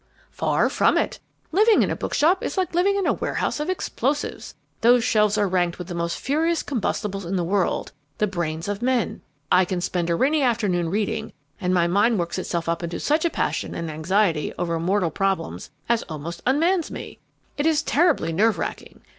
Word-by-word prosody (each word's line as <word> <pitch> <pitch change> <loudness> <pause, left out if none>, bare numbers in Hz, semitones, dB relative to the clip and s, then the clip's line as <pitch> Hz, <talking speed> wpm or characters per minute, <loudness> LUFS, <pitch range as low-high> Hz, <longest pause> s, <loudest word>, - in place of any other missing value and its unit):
"Far - - +1
from - - +2
it. - - -1 0.3
Living 425 +6 +5
in - - -1
a - - -1
bookshop 345 +6 +1
is - - -3
like 370 -2 0
living 375 +4 +3
in 395 -2 0
a - - +3
warehouse - - -2
of 300 +4 -2
explosives. 290 -6 -2 0.3
Those 240 +1 +5
shelves 210 -1 +2
are 205 -1 +2
ranked 180 -2 0
with 180 0 -8
the - - -4
most 170 0 -2
furious 320 +4 0
combustibles 210 -5 -2
in 180 +3 -3
the 180 - 0
world 190 +1 0 0.3
the 210 - +2
brains 170 -4 -3
of 205 +1 -3
men. 250 -2 0 0.3
I 180 +1 +6
can 180 0 -2
spend 175 -1 -1
a 170 - +2
rainy 285 - +2
afternoon 205 -9 +1
reading, 220 +3 -2 0.3
and 180 - -1
my 175 -2 +3
mind 205 +6 +3
works 170 +1 -2
itself 170 -2 -3
up 170 0 0
to 170 0 -4
such 310 +3 +1
a - - +3
passion - - -2
and 165 -1 -4
anxiety 165 +1 +1
over 170 -2 -1
mortal 180 0 +1
problems 190 - -2 0.2
as 235 -1 +2
almost 160 +2 -6
unmans 330 +6 +2
me. - - -8 0.4
It 290 +2 0
is 315 -2 +2
terribly 300 - +2
nerve 215 +6 +3
racking. - - -6
205 Hz, 195 wpm, -23 LUFS, 170-280 Hz, 0.4 s, I